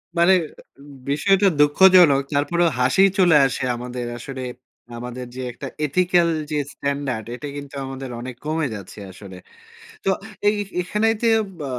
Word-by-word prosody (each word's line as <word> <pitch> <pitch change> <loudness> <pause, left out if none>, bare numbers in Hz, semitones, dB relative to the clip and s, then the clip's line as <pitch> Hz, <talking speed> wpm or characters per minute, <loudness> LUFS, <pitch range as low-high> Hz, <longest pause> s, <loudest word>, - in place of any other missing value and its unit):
মানে 170 +3 +5 0.8
বিষয়টা 195 +7 +3
দুঃখজনক। 150 -1 +6
তারপরেও 170 +4 +2
হাসিই 190 +10 +4
চলে 175 -4 +5
আসে 130 - -2
আমাদের 125 0 -6
আসলে, 130 +2 -7 0.6
আমাদের 125 +1 -7
যে 130 - -5
একটা 135 +3 -8 0.2
এথিক্যাল 175 +2 +2 0.2
যে 150 - 0 0.2
স্ট্যান্ডার্ড 140 -6 -3
এটা 145 +3 -7
কিন্তু 140 -1 -9
আমাদের 135 -1 -7
অনেক 125 0 -7
কমে 155 -1 -1
যাচ্ছে 100 +1 -10
আসলে। 95 -1 -12 0.7
তো - - +2 0.4
এই 210 - +4 0.3
এখানে 210 +5 -1
ইতে 230 +1 0 0.3
বা 140 -2 -5
145 Hz, 135 wpm, -22 LUFS, 125-175 Hz, 0.8 s, দুঃখজনক